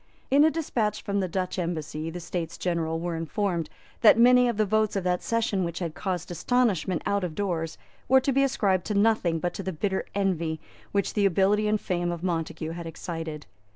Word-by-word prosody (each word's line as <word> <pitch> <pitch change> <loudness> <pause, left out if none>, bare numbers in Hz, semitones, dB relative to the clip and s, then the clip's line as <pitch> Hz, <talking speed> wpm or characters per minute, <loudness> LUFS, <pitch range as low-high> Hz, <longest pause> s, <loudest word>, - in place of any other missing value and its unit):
In 280 +2 +6
a 315 - +6
despatch 250 -10 -1
from 200 -1 -1
the 190 - 0
Dutch 185 +1 -2
embassy 160 -2 -3
the 175 +2 -6
States 170 -1 -4
General 165 -2 -1
were 170 0 -3
informed 165 0 -2 0.3
that 220 -1 +7
many 250 +1 +6
of 235 - -2
the 215 - +3
votes 215 +1 +1
of 195 - -1
that 180 0 0
session 225 -4 0
which 170 -1 -3
had 170 -4 -3
caused 180 -2 -3
astonishment 190 -3 +1
out 200 -1 0
of 170 -4 -3
doors 170 -5 -2 0.3
were 265 +1 +6
to 275 - +1
be 275 - +3
ascribed 200 -9 +1
to 210 - -2
nothing 200 -5 +3
but 175 +2 -2
to - - -5
the 190 0 -3
bitter 190 +3 -2
envy 170 -5 0 0.3
which 200 -1 0
the 205 -2 +3
ability 200 +3 +2
and 210 0 +2
fame 175 -2 -1
of 170 0 -5
Montague 165 -2 -2
had 170 0 -6
excited. 165 -2 -6
185 Hz, 205 wpm, -27 LUFS, 165-210 Hz, 0.3 s, that